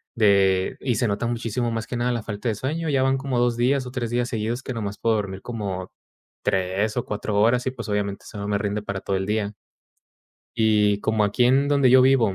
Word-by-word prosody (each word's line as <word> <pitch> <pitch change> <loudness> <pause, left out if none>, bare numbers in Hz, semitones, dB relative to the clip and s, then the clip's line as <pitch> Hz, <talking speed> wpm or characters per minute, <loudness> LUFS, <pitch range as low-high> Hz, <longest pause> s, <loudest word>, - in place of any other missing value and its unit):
de 100 -4 +3
y 125 -4 -1
se 120 - +1
nota 100 +3 -1
muchísimo 120 0 -2
más 115 -1 -3
que 125 - -4
nada 125 +1 0
la 120 -2 -1
falta 105 +2 -3
de - - +1
sueño. 155 +8 -2
Ya 135 -2 +2
van 135 0 +2
como 135 -2 -1
2 120 -1 +1
días 130 +2 +2
o - - -7
3 120 -3 -3
días 120 0 0
seguidos 115 +2 -2
que 130 - -4
nomás 105 -3 -4
puedo 115 -1 +2
dormir 95 -2 -3
como 100 -6 -5 0.5
3 95 +4 0
o 120 - -1
4 105 0 -2
horas, 120 +4 +3
y 130 - +1
pues 130 - -8
obviamente 100 -1 -2
eso 105 - -9
no 100 0 -4
me 100 - +1
rinde 105 0 -2
para 100 -2 -4
todo 100 - -2
el 95 - -2
día. 105 0 -1 1.1
Y 105 -2 +3
como 110 0 +1
aquí 110 +5 +2
en 135 +3 +3
donde 140 -3 +4
yo 130 +1 +7
vivo, 125 -6 +4
115 Hz, 235 wpm, -24 LUFS, 100-125 Hz, 1.1 s, yo